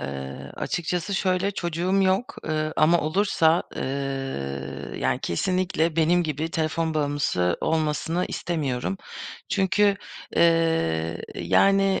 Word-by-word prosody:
Eee, 70 -1 -6
açıkçası 180 +2 -2
şöyle; 185 0 +1
çocuğum 180 +1 0
yok, 195 +9 +1
ııı, 155 0 -1
ama 165 +2 +4
olursa, 165 0 +2
ııı, 135 - -4
yani, - - 0
kesinlikle 170 - 0
benim 170 +2 +4
gibi 155 +1 -2
telefon 160 -1 -1
bağımlısı 145 - +1
olmasını 160 +2 0
istemiyorum. 155 0 -2 0.5
Çünkü, 200 +1 +3 0.4
eee, 160 - +2
yani, 195 -1 +3
160 Hz, 100 wpm, -25 LUFS, 140-185 Hz, 0.5 s, ama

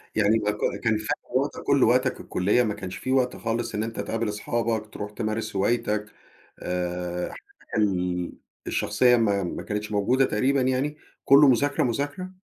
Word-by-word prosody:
يعني 110 +1 +3
ما 105 -1 0
ك 105 - -7 0.3
كان 115 -2 +2
خد 110 - -7 0.3
وقتك - - -2
كلّه، - - +4
وقتك - - +2
الكلية 105 +7 +1
ما 105 -2 -1
كانش 95 -2 -7
في 130 - -4
وقت 130 -1 +2
خالص 115 0 -3
إن 105 - 0
أنت 115 0 -5
تقابل 115 -1 -2
أصحابك، 110 +1 -2
تروح 105 0 -6
تمارس 110 0 -3
هوايتك 105 +1 0 0.6
آآ، 90 0 -2
حياتك - - -10
ال 90 -4 0 0.3
الشخصية 125 -1 +3
ما 100 -4 +2
ما 85 - -4
كانتش 105 0 -4
موجودة 120 +6 +2
تقريبًا 130 +5 +1
يعني، 130 +4 0 0.3
كلّه 140 +2 +7
مذاكرة، 140 +3 +3
مذاكرة؟ 145 +9 -2
110 Hz, 165 wpm, -25 LUFS, 105-125 Hz, 0.6 s, كلّه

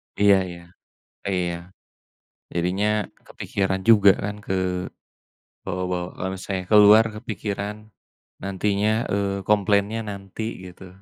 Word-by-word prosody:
Iya 100 -1 +5
iya, 85 0 -10 0.7
iya, 90 -2 -1 1.0
jadinya 90 +5 0 0.4
kepikiran 95 -1 -2
juga 100 -3 +7
kan 105 0 -3 1.1
kebawa-bawa. 90 -1 -4
Kalau 95 - -3
misalnya 95 0 -4
keluar 105 +1 +8
kepikiran, 105 -1 -4 0.7
nantinya, 100 +2 0 0.2
eee, 100 -1 -1
komplainnya 105 +1 +2
nanti 100 +2 -7 0.2
gitu. 90 +1 -11
100 Hz, 95 wpm, -23 LUFS, 95-105 Hz, 1.1 s, keluar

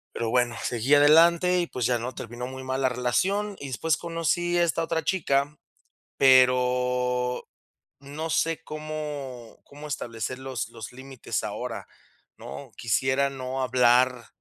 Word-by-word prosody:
Pero 115 - -2
bueno, 120 0 +1
seguí 120 +4 +2
adelante 170 +5 +5
y, 175 - -1
pues, 125 -7 -2
ya, 120 -1 +1
¿no?, 125 +3 -5
terminó 120 +2 -6
muy 130 0 -8
mal 130 +1 -2
la 130 - +3
relación. 190 - 0
Y 140 - -7
después 150 +4 0
conocí 170 +1 -1
a 175 - +4
esta 165 -1 +1
otra 160 0 -1
chica, 145 -5 0 0.6
pero, 125 -1 +3 0.5
no 145 +4 -6
sé, 165 +1 0
cómo 150 -6 -6
cómo 145 +1 -11
establecer 125 -2 -4
los 130 -5 -4
los 115 -1 -9
límites 130 0 -5
ahora, - - -5 0.5
¿no? - - -9
Quisiera 130 +4 +1
no 130 -1 -5
hablar 125 -1 +3
130 Hz, 140 wpm, -26 LUFS, 125-155 Hz, 0.6 s, adelante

